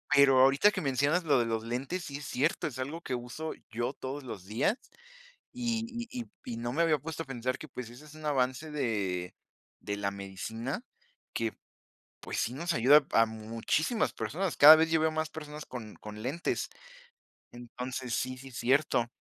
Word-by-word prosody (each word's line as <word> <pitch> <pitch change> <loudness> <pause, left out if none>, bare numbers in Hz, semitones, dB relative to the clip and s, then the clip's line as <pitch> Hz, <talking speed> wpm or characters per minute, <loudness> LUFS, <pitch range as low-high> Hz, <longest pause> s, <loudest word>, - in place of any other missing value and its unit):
Pero 135 -2 +7
ahorita 135 +10 +6
que - - -3
mencionas 140 +5 +2
lo 145 -5 +4
de 120 - +2
los 115 -1 -1
lentes, 130 +10 -3
sí 140 0 -5
es 145 - -8
cierto, 140 +6 0
es 130 -3 -7
algo 150 +6 -4
que 130 - -3
uso 125 +6 -5 0.2
yo 120 +4 -1
todos 135 +2 -6
los 100 -7 -7
días, 110 - +1 0.8
y 235 -2 -1 0.3
y 250 - -4 0.3
y 120 - -3
y - - -5
no 120 +1 -3
me 165 - +2
había 155 -3 +3
puesto 160 +3 -5
a - - -27
pensar 130 -1 -2
que, 155 - -9
pues, 125 -2 -7
ese 125 +5 -13
es 150 - -13
un 155 0 -11
avance 135 +1 0
de 100 -11 -1 0.5
de 100 - -3
la 100 -1 -1
medicina 110 - -5 0.5
que, 115 -1 0 0.7
pues, - - -5
sí 115 - 0
nos 170 +4 -1
ayuda 135 +4 +6
a 115 - +6
muchísimas 115 - -1
personas, 185 +1 -2
cada 155 +2 +11
vez 160 +1 +2
ya 160 - +4
veo 160 0 +2
más 155 0 -1
personas 150 -1 -7
con 110 -4 -8
con 105 0 -9
lentes. 145 +8 -1 0.8
Entonces, 125 +1 -5
sí, 130 +2 -1
sí 135 +1 -10
es 120 - -9
cierto. 125 -1 +2
130 Hz, 190 wpm, -30 LUFS, 115-155 Hz, 0.8 s, cada